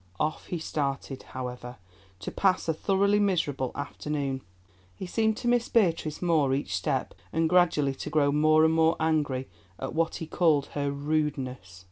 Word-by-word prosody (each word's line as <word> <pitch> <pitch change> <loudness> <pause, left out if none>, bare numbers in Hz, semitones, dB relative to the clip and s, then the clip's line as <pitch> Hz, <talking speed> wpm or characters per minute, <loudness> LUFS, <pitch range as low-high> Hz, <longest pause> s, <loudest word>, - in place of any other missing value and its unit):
Off 155 +1 -2
he 175 - -3
started, 140 -4 -3
however, 125 -1 -7 0.4
to 95 - -6
pass 190 -3 +1
a 160 - +2
thoroughly 200 +5 +2
miserable 160 -10 0
afternoon. 145 -1 -3 0.5
He - - -6
seemed 220 +4 +1
to 240 - -4
miss 240 -1 +2
Beatrice 165 -7 +1
more 155 -6 +3
each 140 - -2
step - - -1 0.2
and 165 0 +1
gradually 165 -5 +3
to 135 - -6
grow 150 -2 +2
more 155 +2 +4
and 160 - +3
more 160 0 +4
angry 150 -5 0 0.3
at 135 - -5
what 165 0 0
he 160 - -5
called 155 -4 +2
her 145 -1 -1
"rudeness." 140 -9 -2
155 Hz, 160 wpm, -28 LUFS, 140-165 Hz, 0.5 s, more